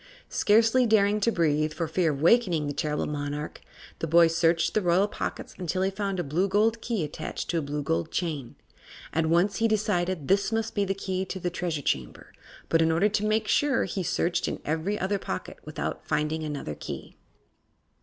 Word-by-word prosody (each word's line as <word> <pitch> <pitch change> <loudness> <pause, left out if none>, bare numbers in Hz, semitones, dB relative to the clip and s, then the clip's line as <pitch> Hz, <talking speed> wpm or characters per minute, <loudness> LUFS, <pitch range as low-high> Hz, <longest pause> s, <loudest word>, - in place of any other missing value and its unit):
Scarcely 230 +4 +4
daring 210 -1 +3
to 230 +3 +2
breathe, 155 -4 +1
for 165 - -2
fear 165 0 +1
of 140 - -3
awakening 175 -4 +4
the 145 - -2
terrible 150 0 -1
monarch, 145 0 -4 0.4
the 165 - -2
boy 170 +2 +6
searched 165 0 +2
in 215 - +3
the 180 - 0
royal 185 +4 +4
pockets - - -5
until 185 +1 -1
he 190 - +1
found 195 -1 -2
a - - 0
blue 165 +7 0
gold 220 +3 +2
key 225 -8 -1
attached 150 +1 -4
to 170 - +1
a - - -2
blue 145 0 -3
gold 85 -10 -1
chain. 155 -8 -3 0.6
At 160 +1 +1
once 175 +5 +2
he 225 - +3
decided 185 -7 0
this 195 +1 +2
must 225 0 -1
be 205 -1 +1
the 195 0 -1
key 190 -1 -2
to 190 - -5
the 175 0 -2
Treasure 170 -5 -3
Chamber, 65 - -3 0.3
but 165 - +3
in 160 0 +3
order 175 +6 +3
to 210 0 -1
make 215 0 +1
sure 290 -2 +2
he 190 +1 -3
searched 175 0 0
in - - -3
every 160 +7 -1
other 195 +1 -1
pocket 95 - -5
without - - -4
finding 155 +1 -1
another 145 - -4
key. - - -8
175 Hz, 200 wpm, -27 LUFS, 155-205 Hz, 0.6 s, boy